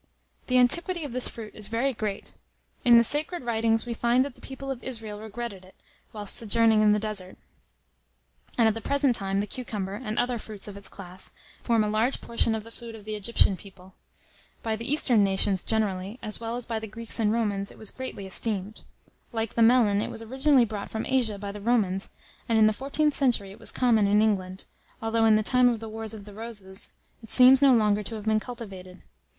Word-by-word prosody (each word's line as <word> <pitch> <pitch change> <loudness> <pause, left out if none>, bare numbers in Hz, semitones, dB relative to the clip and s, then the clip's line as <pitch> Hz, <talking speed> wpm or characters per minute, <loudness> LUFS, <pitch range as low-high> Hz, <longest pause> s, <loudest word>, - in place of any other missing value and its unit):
The 255 - +3
antiquity 340 +7 +2
of 285 - -5
this 250 +1 +3
fruit 220 -2 -9
is 210 -1 -4
very 235 +5 0
great. 210 -3 -5 0.5
In 240 -1 +7
the 235 - +6
sacred 300 +6 -1
writings 225 -1 +1
we 240 - -3
find 240 +3 +2
that 280 - -7
the - - -21
people 270 0 -7
of 255 -2 -6
Israel 225 -5 -5
regretted 220 -2 -7
it, 185 - -18 0.4
whilst 205 -2 +2
sojourning 225 -1 +4
in 210 -1 +5
the 210 - +3
desert; 210 -3 -2 1.2
and 230 -2 +5
at 220 - +3
the 225 - -6
present 280 0 +2
time, 195 -1 0
the - - -2
cucumber, 210 -4 -5
and 215 0 -5
other 245 -1 0
fruits 215 -2 -6
of 205 - -8
its 200 -1 -7
class, 185 -1 -6 0.3
form 230 -2 +2
a - - -1
large 220 +5 +1
portion 230 -1 +1
of 220 - -5
the 230 - -13
food 230 -1 -10
of 210 -2 -13
the 215 - -5
Egyptian 210 -1 +2
people. 190 -1 -15 0.7
By 225 -1 -1
the 230 +5 -3
Eastern 245 -8 +4
nations 195 -1 +1
generally, 205 -1 -1
as 215 - -3
well 230 0 -4
as 245 -1 -5
by 225 -1 -3
the 220 - -7
Greeks 225 +2 -3
and 215 -2 +2
Romans, 205 -3 -1
it - - -15
was 220 - -5
greatly 260 -6 -7
esteemed. 200 +1 -1 0.5
Like 225 -2 -3
the 230 - 0
melon, 225 -3 +5
it - - -3
was 225 - -7
originally 265 +2 +3
brought 210 -2 -6
from 220 0 -4
Asia 245 -6 0
by 200 0 -5
the 205 0 -9
Romans, 200 -4 +1 0.4
and 225 - +3
in 220 - +6
the 215 - +4
14th 285 +5 0
century 240 -9 +1
it 195 - -13
was - - -2
common 225 -5 +3
in 205 +1 +4
England, 190 -3 0 0.3
although, 225 0 +1
in 220 -1 +6
the 215 - +2
time 250 +2 +4
of 235 -2 -1
the 225 - -7
wars 220 0 -4
of 205 -2 -10
"the 205 - -12
Roses," 205 -3 -6 0.3
it 225 - -13
seems 255 +2 +7
no 270 -3 +6
longer 210 -2 +2
to 215 +3 -6
have 215 -1 -7
been 215 0 +2
cultivated. 195 -6 -8
220 Hz, 220 wpm, -26 LUFS, 205-240 Hz, 1.2 s, In